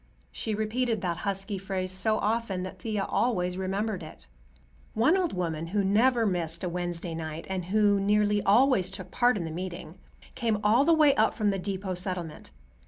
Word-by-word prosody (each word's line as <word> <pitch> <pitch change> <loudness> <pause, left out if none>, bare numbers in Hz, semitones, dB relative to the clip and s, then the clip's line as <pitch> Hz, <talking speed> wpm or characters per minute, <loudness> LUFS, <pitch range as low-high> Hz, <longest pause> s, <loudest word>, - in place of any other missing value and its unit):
She 220 - -3
repeated 220 +1 -1
that 175 -3 -2
husky 195 +1 -3
phrase 185 -1 -3
so 215 +3 +1
often, 210 -4 -1
that 185 - -8
Thea 210 -3 -2
always 180 -7 0
remembered 190 +1 -2
it. 155 -1 -11 0.7
One 245 +11 +4
old 370 -3 0
woman, 165 -3 -3
who 200 +3 0
never 230 +4 +3
missed 170 -4 -2
a 180 - -1
Wednesday 175 -1 -4
night, 160 0 -5
and 185 -2 -2
who 205 +1 +3
nearly 205 +1 +2
always 205 -2 +4
took 190 -2 -9
part 245 -1 +3
in 175 - -3
the 160 - -5
meeting, 180 0 -7 0.3
came 230 -4 0
all 230 +7 +4
the 335 - +4
way 300 -3 +5
up 220 -2 +2
from 210 -3 +1
the 195 - -2
depot 190 0 -3
settlement. 180 -3 -4
195 Hz, 180 wpm, -28 LUFS, 180-220 Hz, 0.7 s, way